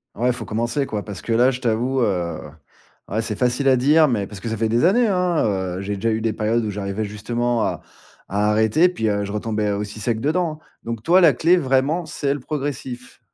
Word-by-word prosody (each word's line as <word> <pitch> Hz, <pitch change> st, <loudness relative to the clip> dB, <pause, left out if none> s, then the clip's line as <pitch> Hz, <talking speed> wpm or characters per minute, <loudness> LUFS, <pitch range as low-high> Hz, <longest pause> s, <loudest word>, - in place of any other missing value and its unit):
Ouais, 120 Hz, +3 st, 0 dB
il 125 Hz, -, +3 dB
faut 125 Hz, -, -6 dB
commencer, 120 Hz, +5 st, -1 dB
quoi, 105 Hz, -5 st, -4 dB
parce 100 Hz, -3 st, -7 dB
que -, -, -5 dB
là, 120 Hz, +3 st, +4 dB
je 130 Hz, 0 st, -6 dB
t'avoue, 125 Hz, +3 st, 0 dB
heu, 90 Hz, -6 st, -1 dB, 0.7 s
ouais, 110 Hz, +3 st, -1 dB
c'est 110 Hz, -2 st, -4 dB
facile 125 Hz, +2 st, +1 dB
à 130 Hz, -, +5 dB
dire, 150 Hz, +4 st, +4 dB
mais 105 Hz, -6 st, -1 dB
parce 100 Hz, -3 st, -10 dB
que 115 Hz, -, -4 dB
ça 110 Hz, -, -3 dB
fait 110 Hz, +1 st, +1 dB
des 115 Hz, +2 st, +1 dB
années, 225 Hz, +8 st, +4 dB
hein, 180 Hz, -4 st, +1 dB, 0.3 s
heu, -, -, -4 dB
j'ai 100 Hz, +1 st, -3 dB
déjà 115 Hz, +3 st, -1 dB
eu 110 Hz, -, 0 dB
des 110 Hz, -1 st, -1 dB
périodes 110 Hz, +2 st, 0 dB
où -, -, -2 dB
j'arrivais 100 Hz, +1 st, -3 dB
justement 115 Hz, +3 st, -1 dB
à -, -, -2 dB, 0.5 s
à 105 Hz, +1 st, +2 dB
arrêter 110 Hz, +10 st, +4 dB
puis, 110 Hz, -11 st, -1 dB
heu, 100 Hz, 0 st, 0 dB
je 100 Hz, -, -6 dB
retombais 105 Hz, -1 st, -1 dB
aussi 105 Hz, +1 st, -4 dB
sec 115 Hz, +1 st, -1 dB
dedans, 155 Hz, +2 st, 0 dB, 0.2 s
donc 115 Hz, -1 st, -5 dB
toi, 175 Hz, +6 st, +5 dB
la 165 Hz, -4 st, +7 dB
clé 170 Hz, +3 st, +3 dB
vraiment, 140 Hz, +3 st, +1 dB
c'est 145 Hz, -2 st, -1 dB
le 145 Hz, -, -5 dB
progressif? 135 Hz, -3 st, -5 dB
115 Hz, 230 wpm, -21 LUFS, 105-140 Hz, 0.7 s, la